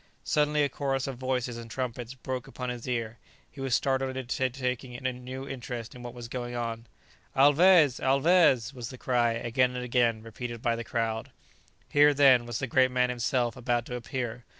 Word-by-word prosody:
Suddenly 150 0 +2
a 140 - +1
chorus 135 -1 -1
of 135 -3 -5
voices 125 -2 -2
and 115 -1 -9
trumpets 125 0 -4
broke 130 -1 -5
upon 125 -1 -5
his 125 -1 -6
ear; 115 -2 -3 0.3
he 140 - -10
was 135 -2 +1
startled 130 -1 0
into 130 0 -1
taking 125 -1 -3
a 130 - -1
new 130 +2 -7
interest 120 -3 -6
in 125 - -11
what 120 0 -8
was 120 -1 -7
going 120 0 -5
on. 115 -1 -4 0.5
"Alvez! 145 +1 +6
Alvez!" 135 -3 +3
was 120 -3 -6
the 130 - -9
cry 120 -2 +1
again 125 +2 0
and 125 0 -3
again 120 -3 +1
repeated 120 +1 -6
by 115 +1 0
the 115 - -5
crowd. 115 -2 -2 0.6
Here, 145 0 +5
then, 130 -4 +5
was 120 -2 -3
the - - -2
great 130 +1 +3
man 125 0 +1
himself 120 0 0
about 120 -2 -1
to 125 - -5
appear. 120 0 -4
125 Hz, 190 wpm, -28 LUFS, 120-130 Hz, 0.6 s, Alvez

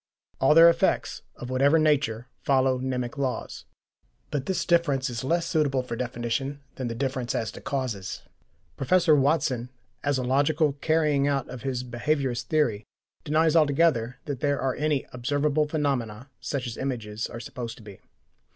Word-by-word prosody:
All 135 +3 +4
their 165 +1 +9
effects, 170 - +1
of 125 +1 -7
whatever 140 +5 +4
nature, 140 -7 +1
follow 130 -2 +2
mnemic 130 +1 -3
laws. 130 -2 -3 0.7
But 140 -1 -2
this 185 -1 -1
difference 145 -7 +2
is 115 0 -4
less 165 +5 +1
suitable 145 -6 +1
for 120 -2 -5
definition 125 +3 -3
than 130 - -4
the 115 - -4
difference 130 -1 -2
as 110 -2 -1
to - - -11
causes. 125 -9 -3 0.5
Professor 160 +3 +4
Watson, 135 -4 +1 0.3
as 145 -1 +1
a 130 - -1
logical 145 +3 +2
carrying 150 -1 +1
out 140 -2 0
of 125 -2 -7
his 130 -2 -2
behaviourist 125 0 -1
theory, 120 -7 +1 0.4
denies 160 +1 +2
altogether 145 -6 +3
that 145 -4 -4
there 145 -1 0
are 130 -1 0
any 150 -2 0
observable 145 +4 +1
phenomena 135 -5 -2
such 135 -3 -3
as 120 -2 -5
images 115 -5 -3
are 115 - -8
supposed 120 -1 -6
to - - -14
be. 100 -2 -12
135 Hz, 160 wpm, -26 LUFS, 125-150 Hz, 0.7 s, their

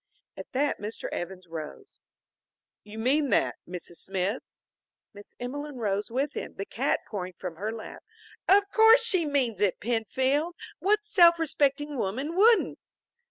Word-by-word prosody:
At - - -10
that 285 +3 0
Mr. 210 +2 -5
Evans 185 +1 -5
rose. 165 - -9 0.8
"You 210 +1 -11
mean 270 +5 +2
that, 205 - +2
Mrs. 175 -1 -7
Smith?" 195 +4 -1 0.7
Miss 205 0 -14
Emelene 285 +4 -5
rose 205 -3 -1
with 270 +5 -1
him, - - -6
the 195 - -4
cat 255 +8 -1
pouring 185 -3 -5
from 175 -3 -6
her 210 +5 -3
lap. 225 -1 -9 0.5
"Of 400 +1 +6
course 450 +2 +6
she 370 -7 +2
means 250 -8 0
it, 200 -3 +2
Penfield. 260 - 0 0.2
What 420 +3 +2
self 345 -5 +6
respecting 290 -3 0
woman 265 - -2
wouldn't!" 445 +4 +4
260 Hz, 145 wpm, -27 LUFS, 205-310 Hz, 0.8 s, Of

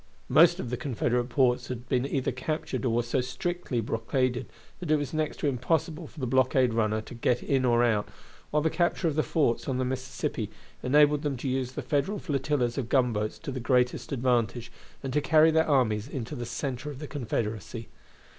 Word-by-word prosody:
Most - - +6
of 120 - -4
the 125 - -1
Confederate 120 -1 -1
ports 125 0 +2
had 125 -1 -6
been 130 0 +1
either 135 -2 -1
captured 135 +1 -3
or - - +2
were 120 +1 +1
so 120 +3 0
strictly 130 0 -2
blockaded 120 +3 -1 0.3
that 175 -4 -6
it 155 - +5
was 145 -1 -2
next 155 -1 -1
to - - +1
impossible 150 +4 -1
for 160 - -13
the 130 - -1
blockade 130 -1 +3
runner 110 -1 +1
to 110 - -11
get 120 +1 0
in 135 -2 +1
or 120 -1 +4
out, 110 -3 +1 0.4
while 150 0 +1
the 160 - +2
capture 175 0 +1
of 160 - +1
the 155 - +2
forts 150 -7 0
on 130 - 0
the 130 - 0
Mississippi 130 -4 -3 0.3
enabled 145 +2 +4
them 145 -4 -2
to 130 - -4
use 130 -1 -1
the 150 - -4
Federal 145 - 0
flotillas 135 -6 -1
of 120 -3 -4
gunboats 115 -6 +1
to 155 - -6
the 130 - -4
greatest 125 +1 +1
advantage, 120 -2 0 0.3
and 135 -1 -3
to 150 - +2
carry 160 +2 +5
their 160 0 +3
armies 115 -6 +2
into 130 -2 -5
the 120 -3 -5
center 135 +2 -4
of 145 - -7
the 150 - -6
Confederacy. 115 -4 -4
130 Hz, 200 wpm, -28 LUFS, 120-145 Hz, 0.4 s, Most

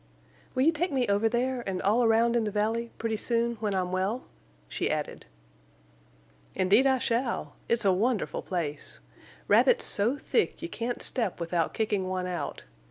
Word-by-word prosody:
"Will 255 - +3
you 320 - +5
take 345 +3 -1
me 260 -3 +1
over 205 +2 +2
there, 250 +2 0
and 185 -1 -2
all 220 +6 +3
around 230 +1 +3
in 235 - +2
the 215 - -1
valley—pretty 225 +1 -1
soon, 235 +1 0
when 210 -2 -2
I'm 180 -1 -1
well?" 190 +7 -1 0.4
she - - -2
added. - - -3 1.3
"Indeed 200 +8 +4
I 265 -1 +4
shall. 240 0 -1 0.2
It's 235 -2 +2
a 190 - +5
wonderful 220 +3 0
place. 155 -5 -3 0.5
Rabbits - - +4
so 230 +7 0
thick 445 - 0
you 335 - -4
can't 240 -2 -3
step 225 -9 +1
without 170 0 -1
kicking 205 -4 0
one 185 -1 -2
out. 180 -1 -4
225 Hz, 165 wpm, -28 LUFS, 195-245 Hz, 1.3 s, you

